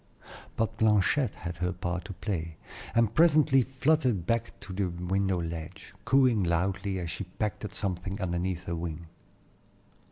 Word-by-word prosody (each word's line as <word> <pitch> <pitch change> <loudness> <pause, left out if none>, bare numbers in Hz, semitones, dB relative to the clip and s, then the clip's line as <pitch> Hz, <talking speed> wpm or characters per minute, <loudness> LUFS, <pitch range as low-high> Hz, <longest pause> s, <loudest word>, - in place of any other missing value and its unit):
But 115 0 -1
Blanchette 110 +3 +3
had 85 -1 -6
her 90 +1 0
part 90 0 -3
to 100 - -6
play, 85 -4 -4 0.4
and 115 -2 +3
presently 155 -4 +5
fluttered 130 - +1
back 115 +2 -1
to 95 - -8
the 100 +1 0
window 90 +2 0
ledge, 80 -1 -6
cooing 130 -6 +4
loudly 95 +3 0
as 85 -2 -3
she 85 +3 -4
pecked 100 +3 -3
at 100 - -6
something 95 0 -2
underneath 90 -1 -2
her 85 -2 -3
wing. 85 0 -5
95 Hz, 150 wpm, -29 LUFS, 85-110 Hz, 0.4 s, presently